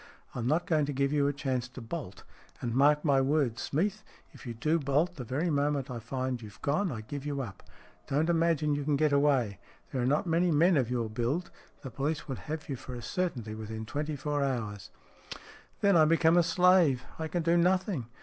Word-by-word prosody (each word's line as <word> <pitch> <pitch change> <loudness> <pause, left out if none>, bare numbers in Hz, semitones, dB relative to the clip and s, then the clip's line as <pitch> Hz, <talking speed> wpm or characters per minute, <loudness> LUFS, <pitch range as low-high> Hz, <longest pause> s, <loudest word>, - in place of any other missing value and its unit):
I'm 120 -1 -3
not 160 +5 +1
going 155 -3 +1
to 145 - -2
give 140 +1 0
you 145 -1 +3
a - - +2
chance 130 -3 -2
to 130 - -10
bolt. 115 - -7 0.4
And 120 -2 -3
mark 150 +4 +4
my 140 -3 +4
words, 135 -4 +1
Smeath, 205 +8 -1 0.3
if - - -12
you 120 - -5
do 155 +8 +1
bolt, 150 +5 +1
the 130 - -6
very 145 +9 -1
moment 145 -2 0
I 120 - -4
find 130 +1 -3
you've 105 -2 -11
gone 170 +6 +1
I 110 -4 -5
give 135 +6 -6
you 145 -1 -2
up. 100 -6 -9 0.5
Don't 150 +4 +1
imagine 165 -3 +2
you 145 0 -1
can 145 0 +1
get 150 +1 +2
away. 135 -9 +2 0.3
There 130 - -1
are 120 - +1
not 145 +6 +2
many 170 +1 +2
men 165 +4 +4
of 130 -5 +1
your 120 -2 -1
build. 120 +11 -2 0.3
The 135 - -6
police 145 +5 -2
would 135 - -4
have 155 0 -4
you 140 - -3
for 125 0 -8
a 120 - -6
certainty 135 - -2
within 110 0 -6
twenty 150 +6 -3
four 145 +1 -1
hours." 110 -8 -3 0.5
" - - -19
Then 200 -2 +4
I 160 -2 +7
become 165 +1 +4
a 175 - +6
slave; 170 -5 +4 0.2
I 160 - -2
can 170 +2 -2
do 170 +1 +3
nothing. 180 - +1
145 Hz, 215 wpm, -30 LUFS, 125-160 Hz, 0.5 s, I